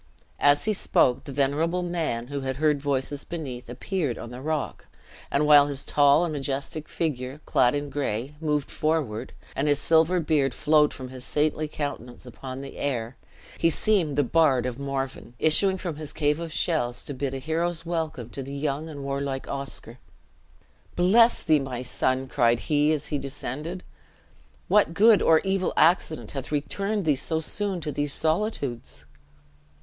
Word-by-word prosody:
As 145 Hz, 0 st, +4 dB
he 215 Hz, -, +2 dB
spoke 125 Hz, -9 st, +2 dB
the 140 Hz, -, -7 dB
venerable 150 Hz, +6 st, 0 dB
man, 160 Hz, -9 st, -2 dB
who 140 Hz, -1 st, -3 dB
had 130 Hz, 0 st, -2 dB
heard 150 Hz, 0 st, +1 dB
voices 140 Hz, 0 st, -1 dB
beneath, 130 Hz, -8 st, -6 dB
appeared 140 Hz, +1 st, -2 dB
on 115 Hz, -, -8 dB
the 125 Hz, +1 st, -8 dB
rock; 155 Hz, -1 st, -3 dB, 0.4 s
and 145 Hz, +2 st, +1 dB
while 145 Hz, -1 st, +7 dB
his 140 Hz, -1 st, -3 dB
tall 145 Hz, +2 st, +4 dB
and 165 Hz, -, -3 dB
majestic 140 Hz, +2 st, -4 dB
figure, 135 Hz, -4 st, -3 dB
clad 125 Hz, +1 st, +3 dB
in 145 Hz, 0 st, -3 dB
gray, 135 Hz, -1 st, -2 dB
moved 150 Hz, -3 st, -1 dB
forward, 155 Hz, -9 st, -1 dB, 0.2 s
and 140 Hz, +3 st, 0 dB
his 145 Hz, -1 st, +3 dB
silver 165 Hz, +4 st, +3 dB
beard 150 Hz, -5 st, +1 dB
flowed 150 Hz, 0 st, +4 dB
from 130 Hz, -1 st, -8 dB
his 130 Hz, -1 st, -10 dB
saintly 155 Hz, +2 st, 0 dB
countenance 130 Hz, -5 st, -6 dB
upon 130 Hz, +2 st, -8 dB
the 140 Hz, -, -9 dB
air, 125 Hz, -3 st, -2 dB, 0.4 s
he 165 Hz, -, +4 dB
seemed 165 Hz, -4 st, +1 dB
the 145 Hz, -, +4 dB
bard 135 Hz, -3 st, +3 dB
of 125 Hz, 0 st, -4 dB
Morven, 135 Hz, -3 st, -4 dB
issuing 190 Hz, +7 st, +4 dB
from 175 Hz, -5 st, -5 dB
his 155 Hz, -1 st, -6 dB
cave 150 Hz, 0 st, 0 dB
of 165 Hz, -1 st, -5 dB
shells 150 Hz, -8 st, -1 dB
to 145 Hz, -, -5 dB
bid 135 Hz, 0 st, -3 dB
a -, -, -2 dB
hero's 165 Hz, +4 st, -2 dB
welcome 160 Hz, -8 st, -3 dB
to 140 Hz, -, -5 dB
the 135 Hz, +1 st, -7 dB
young 145 Hz, +2 st, -2 dB
and 145 Hz, -3 st, -7 dB
warlike 140 Hz, -1 st, -3 dB
Oscar. 135 Hz, -3 st, -5 dB, 1.0 s
"Bless 225 Hz, +7 st, +4 dB
thee, 155 Hz, -3 st, +4 dB
my 130 Hz, -2 st, -4 dB
son," 130 Hz, +1 st, 0 dB
cried 120 Hz, -2 st, +2 dB
he, 150 Hz, 0 st, +2 dB
as 150 Hz, -2 st, -1 dB
he 145 Hz, -, -1 dB
descended; 145 Hz, +6 st, -5 dB, 0.8 s
"what 205 Hz, -5 st, +3 dB
good 215 Hz, +3 st, +6 dB
or 160 Hz, -1 st, +5 dB
evil 195 Hz, -1 st, 0 dB
accident 160 Hz, -1 st, +2 dB
hath 135 Hz, 0 st, -6 dB
returned 195 Hz, +7 st, -1 dB
thee 150 Hz, -3 st, +3 dB
so 160 Hz, +4 st, -1 dB
soon 195 Hz, +4 st, -1 dB
to 150 Hz, -, -3 dB
these 145 Hz, 0 st, -1 dB
solitudes?" 155 Hz, -, -2 dB
145 Hz, 170 wpm, -26 LUFS, 135-160 Hz, 1.0 s, while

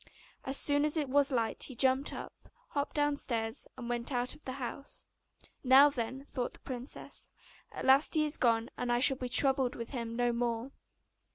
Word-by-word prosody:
As 270 Hz, +1 st, +1 dB
soon 290 Hz, 0 st, +4 dB
as 300 Hz, +2 st, +1 dB
it 295 Hz, -4 st, -1 dB
was 280 Hz, +1 st, +4 dB
light 230 Hz, -3 st, -1 dB
he 260 Hz, -, -9 dB
jumped 265 Hz, +3 st, +2 dB
up, -, -, -10 dB, 0.2 s
hopped 285 Hz, 0 st, -3 dB
downstairs, 270 Hz, -7 st, -1 dB
and 245 Hz, -2 st, -7 dB
went 240 Hz, +2 st, -2 dB
out 245 Hz, -1 st, -1 dB
of 305 Hz, -, -17 dB
the 260 Hz, -, -4 dB
house. 270 Hz, +1 st, -7 dB, 0.6 s
'Now, 270 Hz, +3 st, +7 dB
then,' 260 Hz, +1 st, -5 dB
thought 250 Hz, -4 st, -4 dB
the -, -, -13 dB
princess, 255 Hz, 0 st, -7 dB, 0.4 s
'at -, -, -6 dB
last 270 Hz, +5 st, +4 dB
he 305 Hz, -1 st, +3 dB
is 300 Hz, -, 0 dB
gone, 230 Hz, -1 st, +1 dB
and 245 Hz, -1 st, -1 dB
I 240 Hz, -, +2 dB
shall 265 Hz, +1 st, +4 dB
be 250 Hz, -1 st, -5 dB
troubled 265 Hz, +1 st, +3 dB
with 230 Hz, -1 st, -7 dB
him 230 Hz, -4 st, -5 dB
no 240 Hz, 0 st, +1 dB
more. 235 Hz, +1 st, -2 dB
260 Hz, 190 wpm, -31 LUFS, 240-280 Hz, 0.6 s, Now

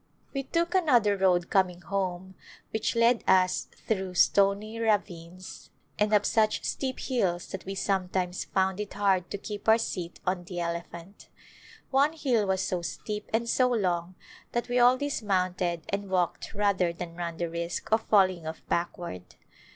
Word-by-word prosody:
We 275 Hz, -, -1 dB
took 335 Hz, +5 st, -1 dB
another 245 Hz, -, +4 dB
road 180 Hz, -2 st, +2 dB
coming 180 Hz, -2 st, +2 dB
home 190 Hz, 0 st, -3 dB, 0.4 s
which 220 Hz, +1 st, -1 dB
led 230 Hz, +1 st, +3 dB
us 185 Hz, -1 st, +3 dB, 0.2 s
through 190 Hz, -4 st, -1 dB
stony 200 Hz, +4 st, +3 dB
ravines 185 Hz, -5 st, -2 dB, 0.3 s
and 210 Hz, 0 st, +2 dB
up 210 Hz, -1 st, +4 dB
such 215 Hz, -1 st, +2 dB
steep 260 Hz, -1 st, -2 dB
hills 185 Hz, -9 st, 0 dB
that 190 Hz, -, -7 dB
we 195 Hz, +1 st, -4 dB
sometimes 185 Hz, -2 st, -1 dB
found 190 Hz, 0 st, 0 dB
it 210 Hz, -1 st, -5 dB
hard 195 Hz, -3 st, +1 dB
to -, -, -4 dB
keep 205 Hz, +2 st, -4 dB
our 220 Hz, -, +7 dB
seat 180 Hz, -6 st, -4 dB
on 180 Hz, -1 st, -1 dB
the 175 Hz, 0 st, -5 dB
ele 170 Hz, 0 st, -1 dB
phant. 170 Hz, +4 st, -12 dB, 0.6 s
One 280 Hz, +3 st, +3 dB
hill 245 Hz, -10 st, +1 dB
was 190 Hz, -1 st, +1 dB
so 180 Hz, -2 st, -1 dB
steep 210 Hz, +4 st, -5 dB
and 230 Hz, +1 st, 0 dB
so 250 Hz, +2 st, +3 dB
long 180 Hz, -6 st, -1 dB, 0.4 s
that 240 Hz, +1 st, -1 dB
we 245 Hz, 0 st, +2 dB
all 245 Hz, +1 st, +6 dB
dismounted 185 Hz, -, -1 dB
and 200 Hz, 0 st, -3 dB
walked 185 Hz, +3 st, -1 dB
rather 200 Hz, -4 st, +2 dB
than 170 Hz, 0 st, -7 dB
run 170 Hz, -1 st, -4 dB
the 170 Hz, -, -1 dB
risk 170 Hz, +3 st, -4 dB
of 220 Hz, 0 st, +4 dB
falling 185 Hz, -6 st, +3 dB
off 160 Hz, -, -7 dB
backward. 170 Hz, -, -3 dB
190 Hz, 165 wpm, -28 LUFS, 175-220 Hz, 0.6 s, our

